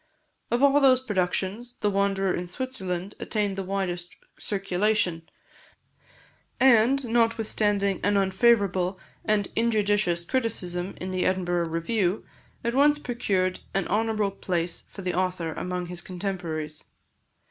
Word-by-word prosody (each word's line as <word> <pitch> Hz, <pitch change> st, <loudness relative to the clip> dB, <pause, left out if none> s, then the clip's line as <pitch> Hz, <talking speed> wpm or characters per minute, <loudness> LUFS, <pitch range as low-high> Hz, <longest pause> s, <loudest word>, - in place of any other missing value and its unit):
Of 240 Hz, +3 st, +1 dB
all 280 Hz, +1 st, +6 dB
those 260 Hz, -2 st, +6 dB
productions, 210 Hz, +1 st, -2 dB
"The 210 Hz, -2 st, 0 dB
Wanderer 195 Hz, -1 st, +1 dB
in 175 Hz, 0 st, -3 dB
Switzerland" 190 Hz, -4 st, -4 dB
attained 205 Hz, -3 st, -1 dB
the 195 Hz, -, -3 dB
widest 185 Hz, -2 st, -3 dB, 0.2 s
circulation; 195 Hz, -3 st, 0 dB, 1.3 s
and, 260 Hz, +1 st, +5 dB
notwithstanding 220 Hz, -4 st, +1 dB
an 205 Hz, +1 st, +2 dB
unfavourable 190 Hz, -2 st, +2 dB, 0.3 s
and 210 Hz, -2 st, +1 dB
injudicious 205 Hz, -6 st, +1 dB
criticism 190 Hz, -7 st, -2 dB
in 185 Hz, +1 st, -4 dB
the 185 Hz, -1 st, 0 dB
Edinburgh 175 Hz, -2 st, 0 dB
Review, 180 Hz, +4 st, 0 dB, 0.4 s
at 235 Hz, -, 0 dB
once 290 Hz, +3 st, +5 dB
procured 200 Hz, -9 st, -1 dB, 0.2 s
an 195 Hz, -, 0 dB
honourable 215 Hz, -2 st, +1 dB
place 175 Hz, -3 st, -2 dB
for 195 Hz, -, -9 dB
the 180 Hz, -, -1 dB
author 180 Hz, -3 st, -1 dB
among 180 Hz, +1 st, -3 dB
his 175 Hz, 0 st, -5 dB
contemporaries. 170 Hz, -5 st, -4 dB
195 Hz, 120 wpm, -26 LUFS, 180-225 Hz, 1.3 s, all